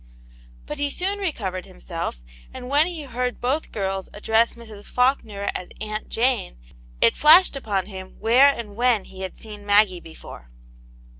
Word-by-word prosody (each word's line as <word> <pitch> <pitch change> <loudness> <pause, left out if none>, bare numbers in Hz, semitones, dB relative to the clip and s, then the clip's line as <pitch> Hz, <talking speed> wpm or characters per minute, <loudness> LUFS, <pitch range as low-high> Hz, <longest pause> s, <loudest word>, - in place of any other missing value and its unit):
But 295 - -6
he 290 0 +1
soon 390 +7 -2
recovered 200 - -3
himself, - - -6 0.3
and 250 - -8
when 295 +4 +4
he 340 -4 -5
heard 250 -2 -3
both 270 +6 -1
girls 195 -2 -3
address 225 +2 +2
Mrs. 220 -3 -12
Faulkner 230 -6 0
as 180 - -5
"Aunt 215 0 -5
Jane," 235 - 0 0.4
it - - +5
flashed 320 +3 +7
upon 205 -8 -2
him 190 -2 -9
where 245 +5 +6
and 225 -6 -7
when 240 -3 +2
he 190 - -11
had 190 -1 -6
seen 210 -2 -10
Maggie 205 -3 +3
before. 160 - -12
220 Hz, 155 wpm, -23 LUFS, 195-265 Hz, 0.4 s, flashed